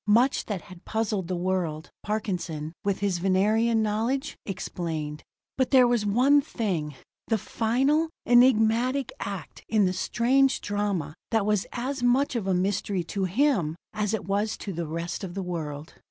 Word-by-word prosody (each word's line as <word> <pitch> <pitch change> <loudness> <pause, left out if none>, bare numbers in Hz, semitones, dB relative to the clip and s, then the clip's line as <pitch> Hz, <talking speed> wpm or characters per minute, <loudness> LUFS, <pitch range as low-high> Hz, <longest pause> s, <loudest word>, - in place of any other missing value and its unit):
Much 240 +6 +3
that 200 -6 -3
had 185 -2 -13
puzzled 210 -5 -1
the 185 - -2
world, 175 -3 -2
Parkinson, 180 -8 -3
with 200 -1 -1
his 195 -4 0
Venerian 215 +5 +2
knowledge, 225 +6 -1
explained; 160 -5 -4 0.4
but 260 - +2
there 255 -3 +6
was 235 -4 +1
one 260 +8 +5
thing, 180 - -3 0.3
the 225 - +2
final, 270 +10 +1 0.2
enigmatical 245 +2 +4
act 195 -6 -6
in 215 -2 +3
the 185 - +1
strange 265 +7 +2
drama, 200 -7 -2 0.2
that 225 -3 +1
was 210 -2 +1
as 260 +2 -3
much 250 +3 +2
of 215 -5 -2
a 190 - +2
mystery 190 0 0
to 190 +3 -2
him 195 - +1 0.2
as 210 -1 -1
it 215 - -6
was 205 +2 0
to 195 - -6
the 170 -1 -3
rest 170 +3 -4
of 180 -2 -6
the 195 - -2
world. 160 -3 -5
205 Hz, 160 wpm, -26 LUFS, 180-235 Hz, 0.4 s, there